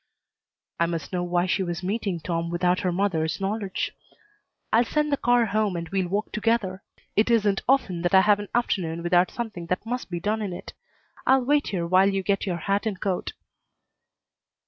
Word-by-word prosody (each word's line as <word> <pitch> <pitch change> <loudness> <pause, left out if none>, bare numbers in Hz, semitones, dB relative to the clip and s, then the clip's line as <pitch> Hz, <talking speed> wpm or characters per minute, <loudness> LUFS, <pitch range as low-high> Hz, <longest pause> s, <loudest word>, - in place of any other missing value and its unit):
I 170 - +3
must 165 +1 -4
know 180 - 0
why 175 0 +1
she 185 +1 0
was 175 0 -3
meeting 195 -2 -2
Tom 165 0 -2
without 180 +1 +1
her 185 -2 0
mother's 170 -4 0
knowledge. 195 0 -2 0.8
"I'll 230 +2 +6
send 300 +4 0
the - - +4
car 245 -3 +3
home 210 -2 0
and 170 -1 -4
we'll 190 -2 0
walk 200 +4 -2
together. 215 -4 0 0.3
It 215 +3 +3
isn't 210 -4 +3
often 190 -11 +2
I 190 - +7
have 205 +1 +4
an 205 - -6
afternoon 170 -8 0
without 175 +1 +3
something 215 -8 -5
that 180 +4 -2
must 245 0 -4
be 175 -1 -3
done 215 +5 -1
in 200 -4 -3
it. - - -8 0.5
I'll 265 -1 +4
wait 290 +2 +2
here 175 -4 -2
while 185 +3 +4
you 195 -1 -1
get 200 +1 0
your 175 -2 -1
hat 200 +5 -1
and 195 -4 -3
coat." 190 -3 -2
195 Hz, 190 wpm, -25 LUFS, 175-215 Hz, 0.8 s, I